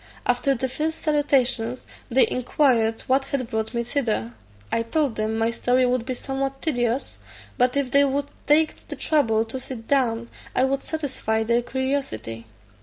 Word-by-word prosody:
After 250 +3 +2
the 260 +2 -1
first 310 +5 -2
salutations, 260 -5 +1 0.2
they 260 +2 +5
inquired 240 -3 +2
what 270 +1 +1
had 270 -4 -3
brought 220 +2 -2
me 235 - 0
thither. 230 - -1 0.4
I - - +1
told 265 +1 0
them 215 +1 -1
my 225 +1 +1
story 250 +2 +2
would 250 -1 0
be 255 - -2
somewhat 270 +1 -3
tedious, 245 -4 -1 0.4
but 250 +2 +2
if 275 -3 0
they 280 0 +5
would 280 +1 -1 0.2
take 310 +1 +2
the - - -5
trouble 225 -8 +2
to 230 +4 -5
sit 245 -3 -7
down, 235 -4 +1 0.3
1 260 - +3
would 275 0 0
satisfy 260 -8 -1
their 235 +2 +2
curiosity. 245 - -3
255 Hz, 165 wpm, -24 LUFS, 230-275 Hz, 0.4 s, they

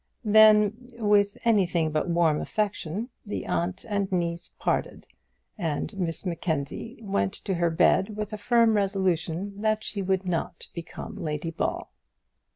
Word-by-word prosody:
Then, 215 +2 +5
with 205 -2 +3
anything 180 -8 +2
but 155 +3 0
warm 170 -3 +2
affection, 205 0 -2 0.2
the 210 - -4
aunt 185 +5 -2
and 200 -3 -1
niece 170 -1 -1
parted, - - -1 0.5
and 165 +3 -2
Miss 175 -1 -3
Mackenzie 170 - -3
went 100 - 0
to 195 - -3
her 170 -1 +1
bed 195 +5 +3
with 210 0 -4
a - - -3
firm 230 0 +4
resolution 190 -1 -1
that 215 0 +1
she 200 - -3
would 190 0 0
not 170 -1 -3
become 170 +5 -7
Lady 160 -2 -3
Ball. - - -2
190 Hz, 140 wpm, -27 LUFS, 170-210 Hz, 0.5 s, Then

